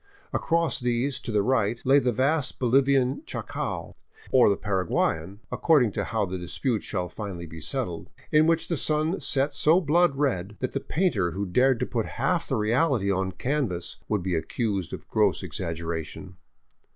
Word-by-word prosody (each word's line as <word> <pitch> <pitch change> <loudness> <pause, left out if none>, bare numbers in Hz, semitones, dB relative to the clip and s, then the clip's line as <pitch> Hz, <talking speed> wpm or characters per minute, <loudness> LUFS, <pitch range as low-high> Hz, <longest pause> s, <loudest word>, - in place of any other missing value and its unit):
Across 165 -2 +1
these, 125 +2 0
to - - -6
the 105 -2 +2
right, 115 -1 +1
lay 135 +2 +6
the 125 -2 +1
vast 135 +4 0
Bolivian 135 +1 +2
Chaco - - -4 0.2
— - - -22
or 130 -4 +6
the 100 - +3
Paraguayan, 95 -1 -1
accord 155 -6 +4
ing 110 - 0
to - - -2
how 110 -3 0
the 95 0 -5
dispute 110 +6 -2
shall 90 -3 -3
finally 95 -4 -6
be 80 0 -10
settled 90 - -3
— - - -26
in 155 +1 +5
which 165 0 +2
the 170 - -1
sun 155 +5 0
set 140 +1 +1
so 155 +5 +4
blood 170 -1 +3
red 105 -8 -1
that 130 - -2
the 135 - -2
painter 130 - 0
who 100 +2 -2
dared 125 +5 +2
put 115 -3 -1
half - - 0
the - - 0
reality 115 -1 +2
on 95 0 0
canvas 95 - -2
would 105 -4 0
be 95 -1 -1
accused 95 - -2
of - - -8
gross - - +1
exaggeration. 80 -1 -5
120 Hz, 175 wpm, -26 LUFS, 95-140 Hz, 0.2 s, lay